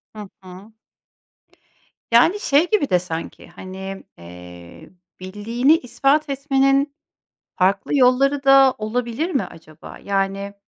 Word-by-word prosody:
Hı 210 Hz, -2 st, -9 dB
hı. 185 Hz, +4 st, -13 dB, 1.4 s
Yani, 290 Hz, -, +4 dB
şey 320 Hz, -2 st, +2 dB
gibi 415 Hz, -10 st, 0 dB
de 180 Hz, -, +3 dB
sanki, 165 Hz, -2 st, -8 dB
hani, 190 Hz, +1 st, -9 dB
eee, 90 Hz, 0 st, -13 dB, 0.3 s
bildiğini 230 Hz, -, 0 dB
ispat 285 Hz, +2 st, 0 dB
etmenin 275 Hz, 0 st, 0 dB, 0.6 s
farklı 190 Hz, +9 st, +1 dB
yolları 275 Hz, +2 st, +2 dB
da 270 Hz, -1 st, +5 dB
olabilir 235 Hz, +8 st, -3 dB
mi 270 Hz, -, 0 dB
acaba? 155 Hz, -2 st, -13 dB
Yani, 195 Hz, 0 st, -2 dB
230 Hz, 105 wpm, -20 LUFS, 190-275 Hz, 1.4 s, da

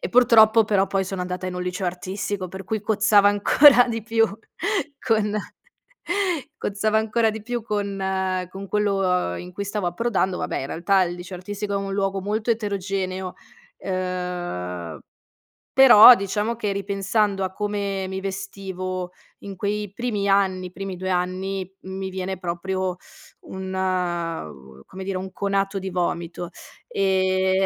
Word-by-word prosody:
e -, -, -3 dB
purtroppo 225 Hz, -2 st, +6 dB
però 195 Hz, -2 st, +2 dB
poi 195 Hz, -1 st, 0 dB
sono 190 Hz, 0 st, -4 dB
andata 180 Hz, 0 st, -4 dB
in 180 Hz, -, -4 dB
un 180 Hz, -, -3 dB
liceo 180 Hz, +1 st, -3 dB
artistico 185 Hz, +1 st, -3 dB
per 190 Hz, +1 st, -8 dB
cui 220 Hz, +1 st, -2 dB
cozzava 210 Hz, -1 st, +4 dB
ancora 245 Hz, +5 st, +6 dB
di 225 Hz, -2 st, -3 dB
più 225 Hz, 0 st, +3 dB, 0.7 s
con 215 Hz, -3 st, +1 dB, 1.2 s
cozzava 215 Hz, +2 st, 0 dB
ancora 220 Hz, +1 st, +2 dB
di 220 Hz, -1 st, -7 dB
più 240 Hz, 0 st, -3 dB
con 205 Hz, -2 st, -2 dB, 0.5 s
con 195 Hz, +1 st, -7 dB
quello, 210 Hz, -1 st, +1 dB
uhm, 180 Hz, -, 0 dB
in 180 Hz, 0 st, -9 dB
cui 200 Hz, +2 st, -4 dB
stavo 200 Hz, -2 st, -2 dB
approdando 190 Hz, -1 st, 0 dB
vabbè, -, -, -2 dB
in 135 Hz, -, -4 dB
realtà 185 Hz, +6 st, +2 dB
il 175 Hz, -1 st, -1 dB
liceo 180 Hz, +1 st, -8 dB
artistico 205 Hz, +2 st, -4 dB
è -, -, +2 dB
un 195 Hz, 0 st, -3 dB
luogo 195 Hz, -1 st, 0 dB
molto 215 Hz, +4 st, -1 dB
eterogeneo, 195 Hz, -4 st, -2 dB, 0.4 s
ehm. 175 Hz, -, -4 dB, 0.8 s
Però 250 Hz, -3 st, +10 dB
diciamo 210 Hz, +3 st, -2 dB
che 205 Hz, -3 st, -1 dB
ripensando 200 Hz, 0 st, 0 dB
a 185 Hz, -, -5 dB
come 200 Hz, -2 st, -2 dB
mi 190 Hz, -, -3 dB
vestivo 190 Hz, -2 st, -5 dB, 0.3 s
in 200 Hz, -1 st, -7 dB
quei 205 Hz, +1 st, -3 dB
primi 210 Hz, -4 st, -2 dB
anni, 190 Hz, -2 st, +2 dB
i -, -, -14 dB
primi 195 Hz, 0 st, -5 dB
2 185 Hz, +1 st, -4 dB
anni, 185 Hz, +1 st, -2 dB
mi 190 Hz, 0 st, -5 dB
viene 190 Hz, 0 st, -4 dB
proprio 185 Hz, +1 st, -3 dB, 0.4 s
un, 190 Hz, 0 st, -7 dB
uhm, 165 Hz, -, -3 dB
come 190 Hz, -, -9 dB
dire, 195 Hz, -1 st, -2 dB
un 190 Hz, +1 st, -6 dB
conato 195 Hz, +1 st, -1 dB
di 190 Hz, 0 st, -4 dB
vomito, 175 Hz, -1 st, -2 dB, 0.4 s
ehm. 190 Hz, 0 st, +2 dB
195 Hz, 150 wpm, -23 LUFS, 185-205 Hz, 1.2 s, Però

